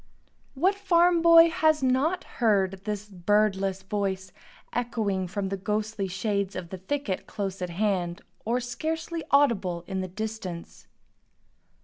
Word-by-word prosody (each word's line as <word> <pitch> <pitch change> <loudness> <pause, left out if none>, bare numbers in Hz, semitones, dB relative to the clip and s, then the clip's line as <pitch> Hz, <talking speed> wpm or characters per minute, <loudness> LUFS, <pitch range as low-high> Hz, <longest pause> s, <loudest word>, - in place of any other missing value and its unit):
What 360 +9 +3
farm 355 -3 +3
boy 335 0 +8
has 315 -3 +2
not 280 +8 +1
heard 195 -4 0
this 210 -1 -3
birdless 195 0 +1
voice 190 -2 -2 0.4
echoing 215 -6 -1
from 195 +2 -3
the 195 - -2
ghostly 210 0 -2
shades 200 0 -2
of 180 -2 -5
the 190 - -7
thicket 205 -1 -3
close 195 -2 -4
at 180 - -2
hand, 180 -2 -1 0.2
or 235 +3 0
scarcely 320 +6 -3
audible 200 -12 +2
in 190 0 -3
the 185 - -3
distance? 195 -3 -6
210 Hz, 130 wpm, -27 LUFS, 190-265 Hz, 0.4 s, boy